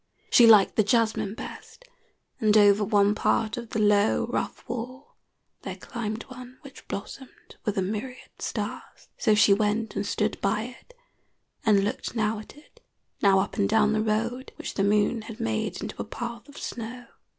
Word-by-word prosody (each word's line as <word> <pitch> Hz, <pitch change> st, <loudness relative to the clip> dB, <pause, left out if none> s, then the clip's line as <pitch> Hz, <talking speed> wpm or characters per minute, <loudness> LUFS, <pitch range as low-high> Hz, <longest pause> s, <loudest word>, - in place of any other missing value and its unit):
She 235 Hz, -, +7 dB
liked 210 Hz, -4 st, +6 dB
the 215 Hz, -, +5 dB
jasmine 220 Hz, -1 st, +1 dB
best, -, -, -10 dB, 0.5 s
and 215 Hz, -1 st, +4 dB
over 205 Hz, 0 st, +5 dB
one 205 Hz, -1 st, +3 dB
part 215 Hz, +1 st, +1 dB
of 235 Hz, -2 st, -7 dB
the -, -, -3 dB
low, 210 Hz, 0 st, +3 dB
rough -, -, -4 dB
wall 250 Hz, +4 st, -7 dB, 0.5 s
there -, -, -6 dB
climbed 225 Hz, -2 st, -5 dB
one 255 Hz, 0 st, -11 dB
which 275 Hz, -2 st, -14 dB
blossomed 255 Hz, +6 st, -9 dB
with 210 Hz, -2 st, -1 dB
a 190 Hz, -, +2 dB
myriad 220 Hz, +6 st, -5 dB
stars. -, -, -5 dB
So 215 Hz, -, +3 dB
she 205 Hz, -1 st, +6 dB
went 215 Hz, +2 st, 0 dB
and 200 Hz, -, -1 dB
stood 210 Hz, +1 st, -1 dB
by 210 Hz, +2 st, +1 dB, 0.2 s
it, -, -, -23 dB, 0.7 s
and 200 Hz, -2 st, +5 dB
looked 225 Hz, +3 st, -3 dB
now 215 Hz, -1 st, 0 dB
at 215 Hz, -, -12 dB
it, 295 Hz, -, -20 dB, 0.4 s
now 195 Hz, -2 st, +5 dB
up 200 Hz, -, -5 dB
and 200 Hz, -2 st, +2 dB
down 215 Hz, -1 st, +3 dB
the 215 Hz, -, +1 dB
road, 230 Hz, +4 st, -1 dB
which -, -, -6 dB
the 195 Hz, -, 0 dB
moon 210 Hz, +3 st, +2 dB
had 220 Hz, 0 st, -10 dB
made 110 Hz, -1 st, -2 dB
into -, -, -5 dB
a -, -, -2 dB
path 235 Hz, +3 st, -7 dB
of 285 Hz, -, -14 dB
snow. 245 Hz, +2 st, -6 dB
215 Hz, 175 wpm, -26 LUFS, 205-235 Hz, 0.7 s, She